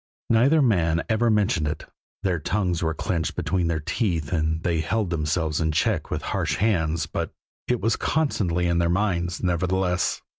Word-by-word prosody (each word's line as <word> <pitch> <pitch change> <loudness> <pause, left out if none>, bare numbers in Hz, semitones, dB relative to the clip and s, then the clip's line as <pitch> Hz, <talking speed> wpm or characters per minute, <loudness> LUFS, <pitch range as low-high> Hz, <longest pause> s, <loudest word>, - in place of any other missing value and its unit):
Neither 135 +7 +5
man 85 -8 +2
ever 115 +1 +2
mentioned 100 -8 +2
it 75 - -4 0.4
their 90 -4 +1
tongues 90 +1 -1
were 80 -1 0
clenched 80 -2 -2
between 90 -3 0
their 85 -1 0
teeth 80 - -1
and 80 0 0
they 85 -2 +1
held 105 +1 -1
themselves 80 -1 0
in 80 -1 +1
check 75 - 0
with - - -3
harsh - - 0
hands 85 -7 +1
but - - -4 0.4
it 125 -1 0
was 115 +2 +1
constantly 95 - 0
in 85 0 +2
their 85 0 +2
minds, 85 -2 0
nevertheless. 90 +1 0
90 Hz, 170 wpm, -24 LUFS, 80-105 Hz, 0.4 s, Neither